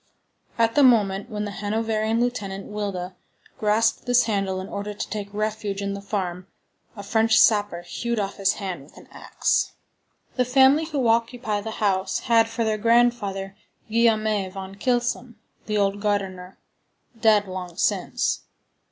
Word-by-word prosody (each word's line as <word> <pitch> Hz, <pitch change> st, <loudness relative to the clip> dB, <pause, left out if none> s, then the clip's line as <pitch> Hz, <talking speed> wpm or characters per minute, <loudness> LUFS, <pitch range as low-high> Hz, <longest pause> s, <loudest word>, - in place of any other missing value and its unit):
At 230 Hz, -1 st, +3 dB
the 290 Hz, -, +4 dB
moment 210 Hz, -5 st, +3 dB
when 210 Hz, -2 st, -3 dB
the 205 Hz, -, -5 dB
Hanoverian 220 Hz, +2 st, -1 dB
lieutenant, 205 Hz, -5 st, -2 dB
Wilda, 195 Hz, -3 st, -4 dB, 0.4 s
grasped 220 Hz, +3 st, +1 dB
this 245 Hz, 0 st, +5 dB
handle 195 Hz, -4 st, -1 dB
in 185 Hz, -, -6 dB
order 205 Hz, +1 st, -5 dB
to -, -, -5 dB
take 205 Hz, -1 st, -4 dB
refuge 210 Hz, -1 st, -3 dB
in 200 Hz, 0 st, -2 dB
the 200 Hz, -, -6 dB
farm, 185 Hz, -3 st, -4 dB, 0.5 s
a 200 Hz, -, -7 dB
French 220 Hz, +2 st, +3 dB
sapper 205 Hz, -5 st, +3 dB
hewed 235 Hz, +6 st, -3 dB
off 200 Hz, -1 st, -3 dB
his 195 Hz, -1 st, +2 dB
hand 185 Hz, -6 st, -5 dB
with 140 Hz, -, -18 dB
an -, -, -14 dB
axe. -, -, -1 dB, 0.6 s
The 250 Hz, -, +4 dB
family 265 Hz, +5 st, +4 dB
who 285 Hz, -6 st, -1 dB
occupy 230 Hz, -2 st, 0 dB
the 220 Hz, -, -5 dB
house 195 Hz, -3 st, 0 dB
had 230 Hz, -1 st, +3 dB
for 230 Hz, 0 st, -2 dB
their 215 Hz, -1 st, 0 dB
grandfather 225 Hz, -4 st, +1 dB, 0.3 s
Guillaume 225 Hz, -1 st, +3 dB, 0.3 s
van 190 Hz, 0 st, -7 dB
Kylsom, 240 Hz, +2 st, -1 dB, 0.3 s
the 210 Hz, -1 st, 0 dB
old 200 Hz, 0 st, +1 dB
gardener, 195 Hz, -3 st, -2 dB, 0.6 s
dead 215 Hz, -3 st, +4 dB
long 180 Hz, -2 st, -7 dB
since. -, -, 0 dB
210 Hz, 150 wpm, -24 LUFS, 195-230 Hz, 0.6 s, this